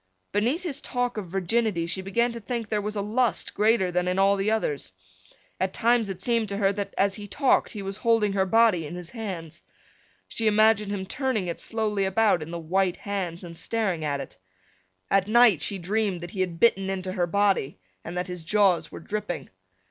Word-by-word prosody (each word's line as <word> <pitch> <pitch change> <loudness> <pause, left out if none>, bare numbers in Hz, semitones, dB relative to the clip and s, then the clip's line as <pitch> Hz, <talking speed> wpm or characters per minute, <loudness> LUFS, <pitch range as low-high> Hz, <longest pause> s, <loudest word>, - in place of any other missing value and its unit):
Beneath 240 - 0
his 300 -5 -3
talk 245 -1 -2
of 210 -4 -5
virginity 195 0 0
she 180 +3 -3
began 235 +6 +1
to 235 - -6
think 230 0 -4
there 210 -1 0
was 210 +1 -4
a 205 - -1
lust 235 +3 0
greater 210 -4 +2
than 180 0 0
in 180 +1 0
all 195 +1 +4
the 200 +1 0
others. 150 - -1 0.7
At 190 0 -1
times 235 -2 +2
it 190 0 -5
seemed 230 -2 +1
to 200 - -3
her 200 -1 +2
that 200 0 -5
as 195 0 +2
he 205 0 -6
talked 270 +6 +2
he 205 -3 -6
was 195 +1 -5
holding 225 -4 +2
her 190 -1 +1
body 215 -7 +3
in 170 - -7
his 175 -1 -8
hands. 190 -9 -6 0.7
She 225 - -1
imagined 215 -1 +4
him 195 -2 -3
turning 255 -1 -1
it 170 -1 -4
slowly 215 -3 -1
about 195 -2 +2
in 155 - -6
the 170 - -4
white 180 +2 0
hands 185 -4 -4
and 170 -1 -9
staring 195 -4 -1
at 145 -2 -1
it. 135 - -8 0.7
At 195 0 +3
night 220 -7 +5
she 200 - 0
dreamed 195 0 -1
that 175 - -7
he 200 - -7
had 175 -3 -2
bitten 195 -5 +3
into 190 -1 -3
her 180 -2 0
body 200 - +1 0.3
and 175 +2 -6
that 180 - -1
his 180 -2 -5
jaws 190 0 +2
were - - -8
dripping. 210 +1 -4
200 Hz, 210 wpm, -26 LUFS, 180-220 Hz, 0.7 s, night